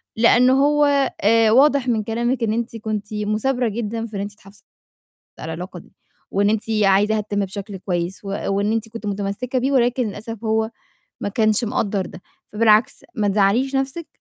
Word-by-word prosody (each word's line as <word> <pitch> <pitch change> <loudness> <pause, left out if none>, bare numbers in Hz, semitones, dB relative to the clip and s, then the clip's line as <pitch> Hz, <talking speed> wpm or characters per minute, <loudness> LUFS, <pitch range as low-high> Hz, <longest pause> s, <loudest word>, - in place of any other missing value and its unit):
لأن 245 +2 +5
هو 290 +2 +4 0.4
آآ، 225 +1 +4
واضح 275 +1 +4
من 220 -3 +1
كلامِك 235 +3 -1
إن 215 -1 +1
أنتِ 230 0 -3
كنتِ 215 -1 -4
مُثابرة 215 +4 0
جدًا 225 +1 -3
في 215 -2 -9
إن 195 - -2
أنتِ 205 0 -5
تحافظي 200 0 -18 0.8
على - - -6
العلاقة 180 +3 -7
دي، - - -18 0.4
وإن 205 +1 +2
أنتِ 220 0 0 0.2
عايزاها 205 +2 +3
تتِمّ 205 -1 -2
بشكل 200 +1 -7
كويّس، 180 0 -3
و - - -9 0.2
وإن 200 +2 0
أنتِ 225 0 -2
كنتِ 230 -1 -8
مُتَمسّكة 205 +6 -2
بيه، 270 +3 0
ولكن 245 -2 +2
للأسف 220 +2 -7
هو 220 0 +1 0.5
ما 205 - -2
كانش 215 +2 +1
مقدّر 205 -3 -1
ده، 185 - -11 0.3
فبالعكس 220 +3 +3
ما 210 -2 0
تزعَّليش 215 +7 +2
نَفْسِك، 270 +5 -2
220 Hz, 175 wpm, -21 LUFS, 205-240 Hz, 0.8 s, لأن